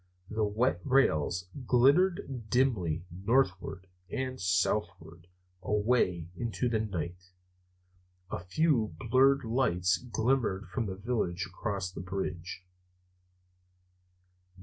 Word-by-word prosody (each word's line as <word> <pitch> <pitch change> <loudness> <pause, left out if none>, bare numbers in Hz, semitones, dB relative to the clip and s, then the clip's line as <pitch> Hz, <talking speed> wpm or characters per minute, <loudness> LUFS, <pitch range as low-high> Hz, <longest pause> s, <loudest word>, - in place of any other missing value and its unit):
The 110 0 0
wet 105 -2 +1
rails 90 - +2 0.2
glittered 135 - +3
dimly 95 - +1
northward 95 -2 0 0.2
and 130 -1 -3
southward 90 -3 -1 0.3
away 105 -5 +1
into 115 +2 -2
the 115 -2 +1
night. 90 -3 -4 1.0
A - - -2
few 110 - +1
blurred 130 +8 +3
lights 95 -7 +1
glimmered 115 -3 0
from 105 +4 -2
the 95 - -4
village 100 -4 -2
across 100 -4 -4
the 90 - -7
bridge. 90 -1 -5
105 Hz, 95 wpm, -30 LUFS, 90-125 Hz, 1.0 s, glittered